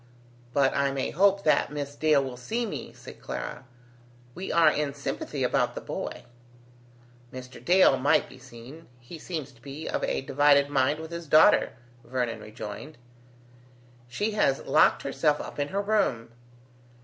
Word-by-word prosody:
"But 135 0 +2
I 140 0 +2
may 135 -1 -2
hope 200 +3 +3
that 155 - +2
Miss 145 -1 -5
Dale 150 -2 +3
will 130 -2 -6
see 225 - -3
me," 210 - -6
said - - -13
Clara. 125 - -6 0.7
"We 185 +6 -6
are 165 -2 +5
in 145 -2 -2
sympathy 140 - -4
about - - +1
the - - -3
boy." - - -6 1.1
"Mr. 130 0 -10
Dale 180 -6 +5
might 130 +2 +2
be 130 - -15
seen. 130 +7 -13
He 125 +7 -11
seems 155 -5 -6
to 120 -3 -23
be 145 +4 -8
of - - -2
a - - -1
divided 140 +1 +3
mind 140 +2 +1
with 160 +1 -8
his 170 -1 -7
daughter," 155 +2 +5 0.3
Vernon 120 -1 -3
rejoined. 110 +7 -9 1.1
"She 205 - -2
has 170 -10 +1
locked - - +4
herself 150 -1 +1
up - - -8
in 145 - 0
her 195 +5 -2
room." 200 - 0
145 Hz, 160 wpm, -27 LUFS, 130-160 Hz, 1.1 s, are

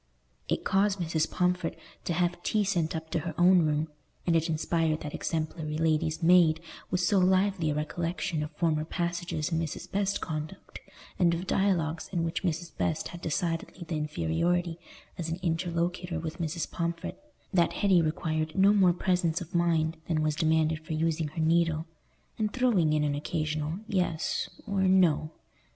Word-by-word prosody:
It - - -1
caused 200 +1 +2
Mrs. 165 -3 0
Pomfret 180 -2 0 0.3
to 170 - 0
have 175 +1 0
tea 215 +2 +1
sent 175 -5 0
up 160 0 -6
to 170 - +1
her 160 0 -5
own 180 +1 +6
room, 150 +1 0 0.4
and 170 - +2
it 165 +1 +2
inspired 160 0 0
that 150 - -6
exemplary 155 -1 -3
lady's 160 +1 +1
maid 165 -2 +6 0.3
with 180 0 0
so 195 +2 +3
lively 185 -2 +2
a 145 - 0
recollection 165 +2 -2
of 150 - -3
former 160 -3 +1
passages 170 -2 -2
in 165 - +1
Mrs. 165 -3 -5
Best's 200 0 +1
conduct, 155 -2 -6 0.4
and 170 -2 +4
of 175 +3 -4
dialogues 170 -5 0
in 175 -3 0
which 165 0 -2
Mrs. 170 -2 -3
Best 90 -3 -1
had 175 - -9
decidedly 170 +2 -2
the 165 - -2
inferiority 165 - 0 0.4
as 165 -1 -3
an 165 - -2
interlocutor 170 0 -1
with 160 +1 -5
Mrs. 165 0 -3
Pomfret, 170 - -3 0.3
that 175 -2 +3
Hetty 190 -4 +4
required 155 -1 -1
no 195 +2 +6
more 190 -4 +5
presence 180 -2 +1
of 175 0 -9
mind 165 -2 +2
than 155 -2 +1
was 155 0 +1
demanded 160 0 +1
for 160 0 -5
using 160 0 0
her 155 +2 -4
needle, 165 0 +2 0.5
and 215 -1 0
throwing 210 -12 +2
in 150 -1 +2
an 145 -1 +1
occasional 155 +1 -2
"yes" 180 -5 -1 0.2
or 200 -3 -1
"no." 185 -5 +4
165 Hz, 170 wpm, -29 LUFS, 155-180 Hz, 0.5 s, own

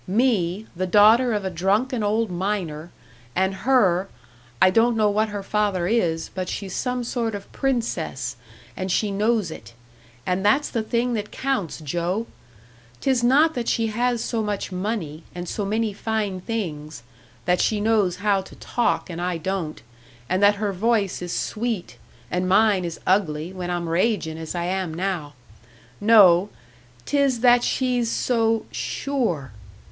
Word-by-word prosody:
Me, 205 -3 +1
the 185 +2 -2
daughter 220 +6 +6
of 205 -3 -1
a 190 - -2
drunken 210 - 0
old 215 0 0
miner, 175 -4 -3 0.5
and 190 +1 +1
her 195 -4 +2 0.5
I 185 - +6
don't 230 +3 +3
know 210 -1 +3
what 215 +1 +1
her 205 -1 -5
father 200 -3 0
is, 175 -6 0
but 185 -1 -3
she's 195 -3 -5
some 250 -1 -1
sort 230 -2 -2
of 200 -1 -9
princess, 175 - -2 0.4
and 185 0 -3
she 205 +3 +1
knows 210 -2 +1
it. 110 -6 -11 0.5
And 185 +1 0
that's 270 +9 +3
the 230 - 0
thing 235 +2 0
that 210 -2 -3
counts, 260 - -2
Joe! 175 +8 -2 0.7
'Tis 260 -3 +1
not 290 +6 +4
that 240 -5 -3
she 225 -1 +1
has 240 0 0
so 230 -2 -1
much 205 -2 -3
money, 180 -5 -3
and 175 0 -5
so 205 - -3
many 215 +1 0
fine 205 -3 -2
things; 155 - -5 0.4
that 180 0 +2
she 215 - +1
knows 205 -4 +2
how 200 +1 +1
to 190 - -13
talk, 240 - -1
and 175 -2 -6
I 180 -1 -1
don't, 170 -2 -4 0.4
and 185 +2 0
that 205 0 +6
her 205 -1 -2
voice 205 -1 0
is 175 -1 -4
sweet, 220 -3 -3 0.3
and 180 +1 0
mine 195 -1 +4
is 170 -1 -5
ugly, 175 -3 +1
when 180 -1 -5
I'm 175 -1 -2
ragin' 165 -2 0
as 160 +2 -6
I 170 - -1
am 185 -3 -2
now. 175 -5 -3 0.6
No 205 -4 +6 0.6
'tis 275 -5 +1
that 245 -1 +5
she's 250 -3 0
so 225 -2 +1
_sure! 225 - -2
205 Hz, 160 wpm, -23 LUFS, 180-230 Hz, 0.7 s, daughter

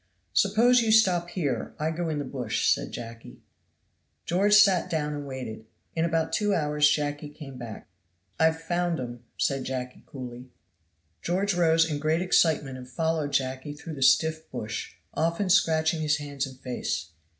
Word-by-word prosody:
"Suppose 235 - +4
you 225 -1 +1
stop 185 -6 +4
here, 145 - -2
I 155 +1 -1
go 165 +1 -2
in 155 - -2
the 145 - -3
bush," 125 -4 -2
said - - -5
Jacky. 115 -1 -9 0.8
George 200 +4 +3
sat 200 -4 +5
down 150 -2 -1
and 145 -1 -5
waited. 115 -5 -7 0.3
In 165 0 +1
about 165 -1 0
two 205 -1 +2
hours 150 -1 +3
Jacky 145 0 -1
came 145 -3 -10
back. 115 -4 -8 0.5
"I've 160 0 +3
found 175 0 -1
'em," 120 -1 -6
said 135 -1 0
Jacky 125 -1 -5
coolly. 125 -1 -8 0.7
George 190 +3 0
rose 165 -2 +4
in 150 -2 -2
great 155 +3 +1
excitement 150 -7 +2
and 125 0 -11
followed 160 +2 -1
Jacky 130 +2 -1
through 155 +2 -8
the 140 - -8
stiff 155 +4 +3
bush, 110 +1 -5 0.2
often 170 +4 0
scratching 160 -4 +3
his 150 -1 +2
hands 145 -2 -4
and 130 -1 -12
face. 125 -9 -3
150 Hz, 160 wpm, -27 LUFS, 130-170 Hz, 0.8 s, sat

